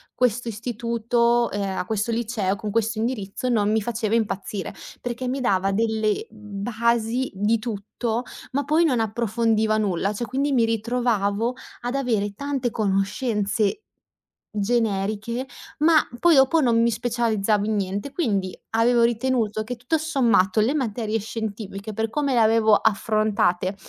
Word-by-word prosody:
questo 245 Hz, -1 st, +1 dB
istituto, 235 Hz, +1 st, 0 dB
ehm, 195 Hz, -2 st, -2 dB
a -, -, -2 dB
questo 220 Hz, +3 st, -1 dB
liceo, 225 Hz, -4 st, -1 dB
con 210 Hz, 0 st, -5 dB
questo 225 Hz, 0 st, 0 dB
indirizzo, 225 Hz, 0 st, -2 dB
non 210 Hz, -4 st, +2 dB
mi 220 Hz, 0 st, +2 dB
faceva 225 Hz, 0 st, -1 dB
impazzire, 205 Hz, -3 st, -2 dB, 0.3 s
perché 245 Hz, +1 st, -4 dB
mi 260 Hz, +2 st, -2 dB
dava 195 Hz, -5 st, +1 dB
delle 220 Hz, 0 st, 0 dB
basi 225 Hz, +3 st, -1 dB
di 210 Hz, +4 st, +1 dB
tutto, 225 Hz, +2 st, -3 dB, 0.3 s
ma 280 Hz, +2 st, 0 dB
poi 310 Hz, +4 st, +3 dB
non 260 Hz, -7 st, +2 dB
approfondiva 220 Hz, 0 st, +1 dB
nulla. 200 Hz, -1 st, 0 dB
Cioè, 240 Hz, +3 st, -3 dB
quindi 275 Hz, +4 st, -1 dB
mi 240 Hz, -3 st, +4 dB
ritrovavo 225 Hz, -1 st, 0 dB, 0.3 s
ad 245 Hz, +2 st, -3 dB
avere 220 Hz, -7 st, 0 dB
tante 270 Hz, 0 st, -2 dB
conoscenze 210 Hz, -, 0 dB, 0.7 s
generiche, 215 Hz, +2 st, -1 dB, 0.3 s
ma 315 Hz, +1 st, +6 dB, 0.2 s
poi 345 Hz, -1 st, +5 dB
dopo 270 Hz, +4 st, +5 dB
non 235 Hz, -4 st, +3 dB
mi 235 Hz, -, +4 dB
specializzavo 220 Hz, -3 st, 0 dB
in 220 Hz, -, 0 dB
niente. 200 Hz, +6 st, -2 dB
Quindi 200 Hz, -, -1 dB
avevo 235 Hz, +1 st, +3 dB
ritenuto 230 Hz, -2 st, +1 dB
che 245 Hz, +3 st, -5 dB
tutto 250 Hz, +7 st, 0 dB
sommato 235 Hz, -, +2 dB
le 235 Hz, +6 st, +2 dB
materie 225 Hz, -4 st, -1 dB
scientifiche, 215 Hz, -1 st, -5 dB
per 220 Hz, +1 st, -1 dB
come 280 Hz, +2 st, 0 dB
le 240 Hz, -, +3 dB
avevo 220 Hz, -1 st, +4 dB
affrontate, 210 Hz, -3 st, +1 dB
225 Hz, 140 wpm, -24 LUFS, 210-245 Hz, 0.7 s, ma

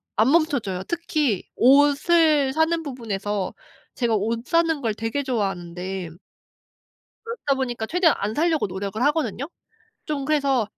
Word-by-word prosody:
안 225 Hz, +6 st, +3 dB
멈춰져요. 275 Hz, -, +1 dB
특히 305 Hz, -, -1 dB
옷을 290 Hz, +2 st, +4 dB
사는 325 Hz, +1 st, +1 dB
부분에서 210 Hz, -8 st, -3 dB, 0.4 s
제가 235 Hz, -3 st, +1 dB
옷 230 Hz, +4 st, -1 dB
사는 330 Hz, -3 st, +1 dB
걸 225 Hz, -3 st, 0 dB
되게 225 Hz, +6 st, -3 dB
좋아하는데 190 Hz, -6 st, -3 dB, 1.2 s
그렇다 460 Hz, -, -1 dB
보니까 245 Hz, -4 st, -3 dB
최대한 340 Hz, +3 st, +3 dB
안 210 Hz, +2 st, -2 dB
사려고 320 Hz, -4 st, +1 dB
노력을 195 Hz, +4 st, -5 dB
하거든요. 285 Hz, -, 0 dB, 0.6 s
좀 285 Hz, -3 st, -3 dB
그래서 275 Hz, -5 st, +2 dB
265 Hz, 290 characters per minute, -23 LUFS, 210-305 Hz, 1.2 s, 옷을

